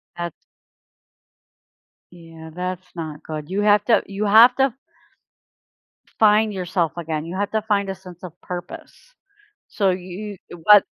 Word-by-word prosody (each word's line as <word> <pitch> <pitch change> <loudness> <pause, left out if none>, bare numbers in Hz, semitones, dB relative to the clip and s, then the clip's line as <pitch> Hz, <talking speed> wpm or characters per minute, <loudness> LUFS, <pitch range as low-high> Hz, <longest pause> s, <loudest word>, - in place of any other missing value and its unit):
That's 170 -2 -5 1.8
Yeah, 165 -2 -12
that's 180 +1 -5
not 155 -3 -6
good. 155 0 -6
You 200 +2 -1
have 205 0 +4
to, 235 - +4
you 200 +2 -3
have 230 +4 +7
to 265 -3 +2 1.5
find 215 0 +4
yourself 175 -3 -1
again. 160 -2 -3
You 175 +2 -6
have 205 0 -2
to 220 0 0
find 200 -2 0
a 190 - -3
sense 180 -2 -14
of 175 -3 -8
purpose. 175 -1 -8 0.7
So 200 -2 +1
you 185 +3 -6 0.2
uh, - - -8
what 210 -1 +8
185 Hz, 140 wpm, -22 LUFS, 170-210 Hz, 1.8 s, what